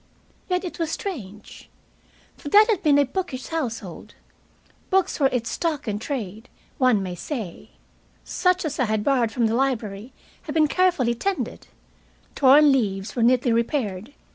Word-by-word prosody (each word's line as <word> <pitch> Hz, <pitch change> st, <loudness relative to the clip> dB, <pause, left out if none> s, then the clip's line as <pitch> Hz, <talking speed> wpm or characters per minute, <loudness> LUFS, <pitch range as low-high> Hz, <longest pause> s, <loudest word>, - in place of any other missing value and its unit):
Yet 360 Hz, 0 st, 0 dB
it 350 Hz, -, -7 dB
was 330 Hz, -2 st, -1 dB
strange. 215 Hz, -, -7 dB, 0.7 s
For 290 Hz, -, -8 dB
that 420 Hz, +7 st, +7 dB
had 400 Hz, -4 st, 0 dB
been 295 Hz, -5 st, +4 dB
a 285 Hz, -, +4 dB
bookish 270 Hz, -3 st, -5 dB
household. 230 Hz, -, -5 dB, 0.7 s
Books 380 Hz, -2 st, +1 dB
were 275 Hz, -, +5 dB
its 235 Hz, -2 st, -2 dB
stock 315 Hz, -7 st, -2 dB
in 210 Hz, -1 st, -2 dB
trade, 225 Hz, -3 st, -5 dB, 0.3 s
one 250 Hz, -7 st, +3 dB
may 185 Hz, -1 st, -4 dB
say. 200 Hz, -, -6 dB, 0.5 s
Such 365 Hz, -1 st, 0 dB
as 295 Hz, -2 st, -4 dB
I 255 Hz, -, +3 dB
had 215 Hz, -1 st, -1 dB
borrowed 250 Hz, -4 st, +2 dB
from 235 Hz, -1 st, 0 dB
the 220 Hz, -, +1 dB
library 230 Hz, -3 st, -2 dB, 0.3 s
had 300 Hz, -, -7 dB
been 310 Hz, -1 st, +4 dB
carefully 345 Hz, -9 st, +2 dB
tended. 385 Hz, +11 st, -3 dB, 0.7 s
Torn 285 Hz, +2 st, +6 dB
leaves 205 Hz, -6 st, -1 dB
were 240 Hz, -, -1 dB
neatly 245 Hz, 0 st, +3 dB
repaired. 230 Hz, -1 st, -2 dB
255 Hz, 155 wpm, -23 LUFS, 220-305 Hz, 0.7 s, that